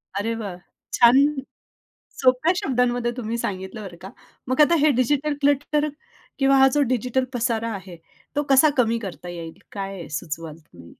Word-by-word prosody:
अरे 225 +3 -1
वाह! 200 -5 -5 0.4
छान 250 +4 +6 1.0
सोप्या 260 +7 +3
शब्दांमध्ये 245 -5 0
तुम्ही 230 0 -3
सांगितलं 190 0 -5
बरं 175 -3 -9
का. 190 - -8 0.4
मग 260 +4 +3
आता 335 +3 +5
हे 305 +1 +4
डिजिटल 290 +4 +1
क्लटर 290 +2 +1 0.5
किंवा 275 0 +4
हा 270 0 +7
जो 295 - +3
डिजिटल 250 +2 0
पसारा 230 -1 -1
आहे, 185 -3 -10 0.4
तो 290 - +1
कसा 275 +3 +6
कमी 230 -1 +2
करता 185 -4 -8
येईल? 165 -2 -8
काय 195 -4 -6
सुचवाल 160 -1 -7
तुम्ही? 85 - -17
235 Hz, 155 wpm, -23 LUFS, 190-270 Hz, 1.0 s, हा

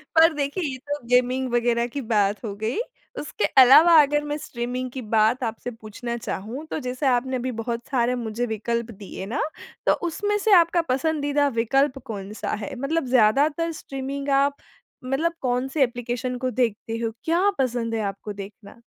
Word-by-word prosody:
पर 325 0 +7
देखिए 290 +5 -2
ये 265 -3 -3
तो 290 0 -2
गेमिंग 250 +1 +2
वग़ेेरह 235 0 +2
की 280 - -1
बात 210 -2 +1
हो 205 - -3
गई 220 - -2 0.4
उसके 300 - -2 0.2
अलावा 305 +7 +8
अगर 295 +1 +1
मैं 295 0 -2
स्ट्रीमिंग 250 -2 -4
की 260 - -6
बात 220 +3 +2
आपसे 230 +2 -4
पूछना 225 +1 -6
चाहूँ 230 +7 -5
तो, - - -2
जैसे 255 +2 -4
आपने 255 +1 +1
अभी 255 +1 -2
बहुत 235 0 -4
सारे 250 -1 +1
मुझे 235 0 -2
विकल्प 235 +1 -2
दिए 195 -2 -8
ना, 230 +8 -2 0.4
तो - - +5
उसमें 415 +5 -1
से 415 0 +2
आपका 340 0 +4
पसंदीदा 290 +1 +1
विकल्प 270 +4 +2
कौन-सा 205 -2 -5
है? 205 - -5
मतलब 275 +4 -1
ज़्यादातर 285 +8 +3
स्ट्रीमिंग 275 +1 -5
आप 280 0 +1 0.5
मतलब 310 +6 0
कौन-से 265 +3 +1
एप्लीकेशन 245 +1 -3
को 255 0 -1
देखते 225 -1 -1
हो, 230 -1 -2
क्या 350 +5 +3
पसंद 240 -3 0
है 220 - -1
आपको 205 +2 -8
देखना? 200 +3 -11
250 Hz, 170 wpm, -24 LUFS, 230-285 Hz, 0.5 s, अलावा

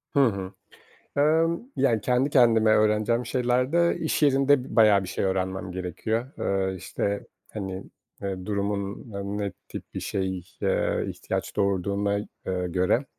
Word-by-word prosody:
Hı - - +5
hı. 95 -3 -3 0.7
Emm, 160 +3 +3 0.2
yani, 115 -6 +2
kendi 125 +5 +2
kendime 115 -5 +5
öğreneceğim 110 +3 +2
şeylerde 130 +7 +2
iş 160 - -1
yerinde 140 -1 +4
b 125 - -8
bayağı 105 -3 +6
bir - - -7
şey 95 - -2
öğrenmem 95 -1 -2
gerekiyor. 95 +6 -2 0.4
Eee, 95 - -4
işte, 100 +2 -3 0.3
hani, 95 -2 -5 0.4
eee, 95 -2 -4
durumun 100 -1 -2
n 100 +1 -4
ne 100 -1 -2 0.2
tip - - -9
bir - - -3
şey, 95 -2 -2 0.2
eee, - - +1
ihtiyaç - - -4
doğurduğuna, 100 +1 +1
eee, 90 -3 -4
göre. 90 +9 +1
105 Hz, 140 wpm, -26 LUFS, 95-125 Hz, 0.7 s, bayağı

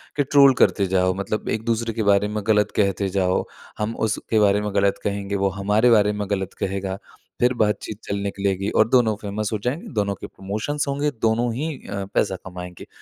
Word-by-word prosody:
कि 145 - +2
ट्रोल 140 -1 +6
करते 100 - +4
जाओ 95 0 +2
मतलब 100 +2 -3
एक-दूसरे 115 +1 -1
के 110 - -1
बारे 100 0 +3
में 105 0 -3
गलत 105 -1 +3
कहते 100 -1 +1
जाओ, 95 -1 +1 0.3
हम 110 +2 -2
उसके 110 0 0
बारे 105 0 +3
में 105 -1 -3
गलत 100 0 +2
कहेंगे 100 0 -2
वो 100 0 +1
हमारे 105 +5 +2
बारे 105 -2 +5
में 105 -1 -3
गलत 95 -1 -2
कहेगा 95 0 -2 0.4
फिर 125 +1 +4
बातचीत 105 0 -2
चल 100 - -3
निकलेगी। 100 0 -1
और 110 - +3
दोनों 120 -4 +3
फ़ेमस 105 +1 -3
हो - - +1
जाएँगे 130 +7 -2
दोनों 100 -2 0
के - - -8
प्रमोशंस 110 +10 -3
होंगे 145 +2 0
दोनों 115 +1 +1
ही 155 +6 -2 0.2
अ, 100 -1 -4
पैसा 95 - +1
कमाएँगे। 90 -1 -8
105 Hz, 195 wpm, -23 LUFS, 100-110 Hz, 0.4 s, ट्रोल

